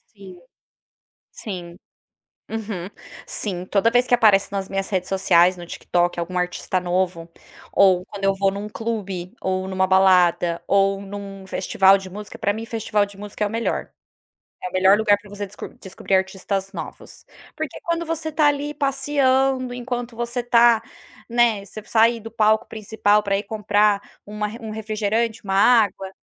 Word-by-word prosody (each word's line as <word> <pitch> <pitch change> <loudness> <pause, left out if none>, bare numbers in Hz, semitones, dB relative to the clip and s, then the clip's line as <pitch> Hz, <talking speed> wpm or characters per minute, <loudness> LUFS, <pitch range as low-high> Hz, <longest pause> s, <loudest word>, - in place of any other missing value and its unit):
Sim, 190 -3 -13 0.9
sim. 180 -6 -7 0.7
Uhum. 205 -5 -5 0.4
Sim, 180 -4 -3
toda 200 +4 +2
vez 245 +1 +3
que - - 0
aparece 210 -5 +4
nas 195 -1 -3
minhas 195 0 -2
redes 185 -2 -2
sociais, 185 -2 +4
no 175 - -8
TikTok, 175 0 -1
algum 180 +2 -3
artista 180 +1 -1
novo, 180 -1 -1 0.5
ou 185 -2 +4
quando 200 0 -10
eu 195 0 +2
vou 195 0 +1
num 200 +2 -6
clube, 200 -6 -4
ou 190 0 -1
numa 190 0 0
balada, 180 -3 +3
ou 195 0 +2
num 195 -1 -8
festival 195 +1 +3
de 190 -1 -9
música, 205 +2 -9
pra 205 - 0
mim 220 +2 -6
festival 215 -2 0
de 200 -1 -14
música 205 +1 -5
é - - +2
o - - -7
melhor. 230 +2 -2 0.7
É - - -3
o - - -21
melhor 190 +2 +5
lugar 210 -1 +3
pra 205 - -16
você 205 0 -6
desco 200 +2 -9
descobrir 190 +1 -3
artistas 190 +1 -1
novos. - - -9 0.3
Porque - - -5
quando 335 0 -2
você 320 -1 -3
tá 300 0 +3
ali 290 0 0
passeando, 270 -2 +1
enquanto 245 -1 -5
você 240 +1 -3
tá, 235 -1 +5 0.5
né, 235 -4 +2
você 215 +2 -9
sair 230 +1 +3
do 225 +1 -9
palco 215 -1 +2
principal 210 -1 +1
pra 200 -1 0
ir 200 - -2
comprar 205 -1 +2 0.2
1 210 0 -4
1 220 -1 -7
refrigerante, 220 +1 -2
1 195 -1 -2
água, 200 -2 +3
205 Hz, 165 wpm, -22 LUFS, 190-225 Hz, 0.9 s, melhor